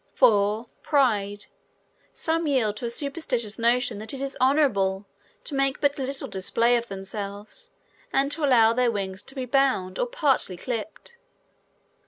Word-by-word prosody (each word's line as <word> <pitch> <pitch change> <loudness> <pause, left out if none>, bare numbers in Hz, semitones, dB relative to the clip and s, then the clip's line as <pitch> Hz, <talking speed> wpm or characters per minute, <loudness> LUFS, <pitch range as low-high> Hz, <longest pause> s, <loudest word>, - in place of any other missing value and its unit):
4. 215 -2 +3 0.2
Pride. 210 -8 +1 0.7
Some 325 0 +1
yield 230 -7 +1
to 240 - -5
a - - -1
superstitious 250 -5 -2
notion 235 -2 +2
that 220 +5 -3
it 270 - -4
is 275 0 -4
honorable 210 -9 +2 0.4
to - - -5
make 275 0 +1
but 285 0 +1
little 270 +1 -2
display 230 +5 +1
of 235 0 -1
themselves, 200 - -6 0.4
and 275 +1 +2
allow 250 -8 +4
their 250 0 +2
wings 195 -3 -3
to 270 - -9
be 260 -2 -3
bound 250 -8 +1
or - - +1
partly 285 - +1
clipped. 255 - -5
245 Hz, 145 wpm, -25 LUFS, 205-275 Hz, 0.7 s, allow